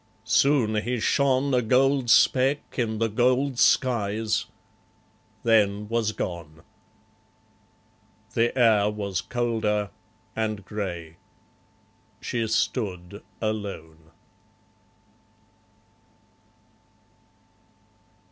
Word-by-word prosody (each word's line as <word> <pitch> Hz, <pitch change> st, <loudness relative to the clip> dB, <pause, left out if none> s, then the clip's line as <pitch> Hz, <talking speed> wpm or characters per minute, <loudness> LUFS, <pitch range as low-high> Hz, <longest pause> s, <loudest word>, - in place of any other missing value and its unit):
Soon 120 Hz, -3 st, +2 dB
he 120 Hz, +2 st, -2 dB
shone 135 Hz, +3 st, +1 dB
A 125 Hz, -, +3 dB
gold 130 Hz, +2 st, +2 dB
speck 135 Hz, +4 st, +3 dB
in 110 Hz, -2 st, -1 dB
the 115 Hz, +1 st, +1 dB
gold 125 Hz, +4 st, +1 dB
skies; 110 Hz, -3 st, +1 dB, 1.0 s
then 105 Hz, -2 st, +2 dB
was 115 Hz, -2 st, 0 dB
gone. 85 Hz, -6 st, -6 dB, 1.7 s
The 120 Hz, +3 st, +1 dB
air 110 Hz, -4 st, +4 dB
was 100 Hz, -3 st, -3 dB
colder, 110 Hz, -3 st, -1 dB, 0.4 s
and 110 Hz, -3 st, -3 dB
grey. 85 Hz, -7 st, -6 dB, 1.0 s
She 115 Hz, -2 st, -2 dB
stood 100 Hz, -4 st, -2 dB, 0.2 s
alone. 95 Hz, -8 st, -5 dB
110 Hz, 70 wpm, -25 LUFS, 100-125 Hz, 1.7 s, air